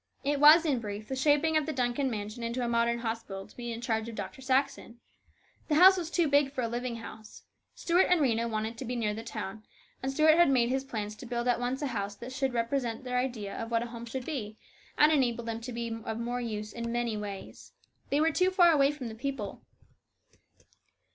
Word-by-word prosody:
It 285 Hz, +1 st, 0 dB
was, 310 Hz, +3 st, +8 dB
in 280 Hz, -6 st, +1 dB
brief, 210 Hz, -1 st, -6 dB
the 265 Hz, -, -2 dB
shaping 295 Hz, +4 st, +2 dB
of 310 Hz, -1 st, +2 dB
the -, -, -1 dB
Duncan 260 Hz, 0 st, 0 dB
mansion 215 Hz, 0 st, -5 dB
into 235 Hz, +2 st, -2 dB
a -, -, -1 dB
modern 235 Hz, 0 st, +1 dB
hospital 225 Hz, -4 st, -5 dB
to -, -, -19 dB
be 240 Hz, -1 st, -5 dB
in 230 Hz, 0 st, -5 dB
charge 225 Hz, -2 st, -1 dB
of 230 Hz, -, -8 dB
Dr. 265 Hz, -, -6 dB
Saxon. 260 Hz, -2 st, -1 dB, 0.7 s
The 300 Hz, -, +1 dB
house 375 Hz, +4 st, +8 dB
was 345 Hz, -4 st, -3 dB
too 345 Hz, -2 st, +2 dB
large 285 Hz, -1 st, +3 dB
for 265 Hz, -, -3 dB
a -, -, 0 dB
living 240 Hz, +1 st, -3 dB
house. 220 Hz, -1 st, -10 dB, 0.3 s
Stuart 350 Hz, +2 st, +2 dB
and 360 Hz, -1 st, +4 dB
Rhena 235 Hz, -5 st, +1 dB
wanted 220 Hz, +1 st, -3 dB
to 265 Hz, -, -5 dB
be 245 Hz, +1 st, -3 dB
nearer 215 Hz, -3 st, 0 dB
the 220 Hz, -, -5 dB
town, 215 Hz, -2 st, -6 dB, 0.4 s
and 265 Hz, -, -2 dB
Stuart 310 Hz, +3 st, +5 dB
had 345 Hz, -, +6 dB
made 245 Hz, -3 st, +3 dB
his 265 Hz, +1 st, 0 dB
plans 215 Hz, -5 st, -5 dB
to 250 Hz, -, -9 dB
build 240 Hz, 0 st, -2 dB
at 245 Hz, -1 st, +2 dB
once 250 Hz, +4 st, -2 dB
a 270 Hz, -4 st, -2 dB
house 200 Hz, -1 st, -3 dB
that 250 Hz, +4 st, -8 dB
would 265 Hz, -2 st, +1 dB
represent 235 Hz, 0 st, -1 dB
their 250 Hz, -1 st, -1 dB
ideas 240 Hz, -6 st, -3 dB
of 225 Hz, -, -5 dB
what 230 Hz, 0 st, +1 dB
a 240 Hz, 0 st, -8 dB
home 235 Hz, 0 st, -7 dB
should 255 Hz, +2 st, -5 dB
be, 220 Hz, -8 st, -5 dB, 0.4 s
and 300 Hz, +1 st, +6 dB
enable 245 Hz, -5 st, +1 dB
them 230 Hz, 0 st, -4 dB
to 250 Hz, +2 st, -6 dB
be 235 Hz, -1 st, -4 dB
of 220 Hz, 0 st, -4 dB
more 240 Hz, +1 st, -3 dB
use 215 Hz, -2 st, -5 dB
in 235 Hz, 0 st, -5 dB
very 235 Hz, -, -3 dB
many 240 Hz, -2 st, -1 dB
ways. 205 Hz, -2 st, -8 dB, 0.4 s
They 285 Hz, -, +2 dB
were 320 Hz, +1 st, +3 dB
too 365 Hz, +4 st, +2 dB
far 355 Hz, -2 st, +5 dB
away 280 Hz, -3 st, +4 dB
from 290 Hz, -5 st, -7 dB
the 225 Hz, -, -6 dB
people. 240 Hz, -3 st, -5 dB
240 Hz, 235 wpm, -29 LUFS, 225-275 Hz, 0.7 s, was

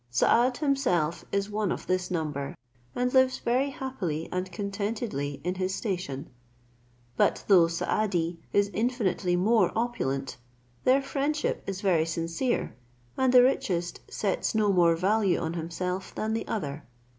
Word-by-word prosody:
Saad 240 Hz, -, +3 dB
himself 180 Hz, -, 0 dB
is 200 Hz, +1 st, -1 dB
one 210 Hz, -3 st, 0 dB
of -, -, -4 dB
this 185 Hz, 0 st, 0 dB
number, 150 Hz, -5 st, -3 dB, 0.4 s
and 250 Hz, 0 st, 0 dB
lives 260 Hz, -1 st, +4 dB
very 255 Hz, +4 st, +1 dB
happily 195 Hz, -, -4 dB
and 185 Hz, 0 st, -3 dB
contentedly 200 Hz, -, -3 dB
in 180 Hz, +2 st, -1 dB
his 185 Hz, 0 st, -2 dB
station: 180 Hz, -, -3 dB, 0.9 s
but -, -, +2 dB
though 180 Hz, -5 st, +6 dB
Saadi 170 Hz, -1 st, -1 dB
is 200 Hz, 0 st, +2 dB
infinitely 210 Hz, -6 st, 0 dB
more 200 Hz, +1 st, +3 dB
opulent, 140 Hz, -, -2 dB, 0.5 s
their 265 Hz, +2 st, +4 dB
friendship 290 Hz, +2 st, -1 dB
is 195 Hz, -1 st, -4 dB
very 170 Hz, -6 st, +2 dB
sincere, 165 Hz, -, -1 dB, 0.4 s
and 260 Hz, -1 st, +2 dB
the 250 Hz, -1 st, +8 dB
richest 175 Hz, -9 st, 0 dB
sets 200 Hz, +1 st, -1 dB
no 210 Hz, -2 st, +3 dB
more 170 Hz, -2 st, +4 dB
value 195 Hz, +1 st, +2 dB
on 165 Hz, 0 st, -2 dB
himself 180 Hz, +3 st, -4 dB
than 220 Hz, 0 st, -1 dB
the 225 Hz, -, -2 dB
other. 150 Hz, -7 st, -3 dB
190 Hz, 140 wpm, -28 LUFS, 170-235 Hz, 0.9 s, the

